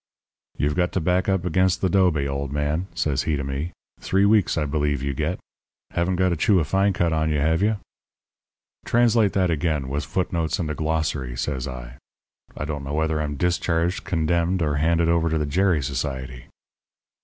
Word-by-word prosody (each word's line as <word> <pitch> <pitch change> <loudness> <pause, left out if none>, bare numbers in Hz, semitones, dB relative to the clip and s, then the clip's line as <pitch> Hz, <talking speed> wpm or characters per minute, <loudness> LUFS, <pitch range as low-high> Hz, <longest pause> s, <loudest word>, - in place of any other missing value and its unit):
"'You've 75 0 +1
got 90 +1 +1
to - - +1
back 90 +3 +1
up 95 -2 0
against 90 +1 +2
th' 95 - +1
'dobe, 85 -7 +3
old 70 0 -3
man,' 75 +5 -1
says 75 -4 0
he 75 - +2
to 70 - -3
me. 70 +5 -3 0.3
'Three 95 +1 +2
weeks, 105 -5 +3
I 75 - +1
believe, 75 -2 -1
you 70 0 -1
get. 80 +6 -2 0.5
Haven't 85 +2 0
got 95 0 +2
a - - +1
chew 95 +4 +3
of 80 - 0
fine 95 +6 +2
cut 85 -3 0
on 80 0 +1
you, 75 - +1
have 80 +4 +2
you?' 105 +1 +2 1.1
"'Translate 115 -3 +3
that 90 -3 +2
again, 75 -4 -1
with 70 +2 -2
foot 90 +3 -2
notes 85 0 0
and 80 -5 -2
a - - -2
glossary,' 75 -6 -2
says 65 -1 -2
I. 60 0 -8 0.6
'I 75 - -3
don't 75 -2 -4
know 70 +1 -5
whether 80 0 0
I'm 75 -1 -3
discharged, 90 +1 0
condemned, 85 +2 0
or 75 -2 0
handed 85 +2 +2
over 85 0 +2
to 80 - 0
the 75 - 0
Gerry 85 0 +1
Society.' 65 -2 -4
80 Hz, 195 wpm, -23 LUFS, 75-90 Hz, 1.1 s, dobe